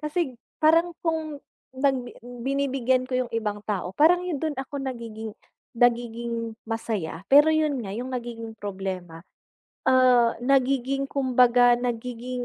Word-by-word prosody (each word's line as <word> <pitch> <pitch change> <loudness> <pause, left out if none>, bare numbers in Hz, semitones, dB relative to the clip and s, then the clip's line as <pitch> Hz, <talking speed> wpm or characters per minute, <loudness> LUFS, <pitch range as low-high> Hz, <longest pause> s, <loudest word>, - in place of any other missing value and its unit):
kasi 300 -5 -2 0.2
parang 330 +3 +4
kung 315 -3 -2 0.3
nag 270 0 +2 0.2
binibigyan 255 +1 -1
ko 255 - 0
'yong - - -12
ibang 210 -2 -2
tao 190 -4 -2
parang 345 +4 +5
'yon 340 -5 -2
do'n 310 -2 -1
ako 270 +2 -7
nagiging 225 -4 -6 0.4
nagiging 235 -1 0 0.2
masaya 205 -8 -3
pero 290 +3 +7
'yon 310 -3 +1
nga 195 - -6
'yong 245 +4 -5
nagiging 230 -2 -6
problema, 190 -4 -6 0.7
ah, 250 -2 +5
nagiging 270 +1 +1
kumbaga 245 -2 +4
nagiging 245 +1 -4
245 Hz, 125 wpm, -25 LUFS, 230-275 Hz, 0.7 s, pero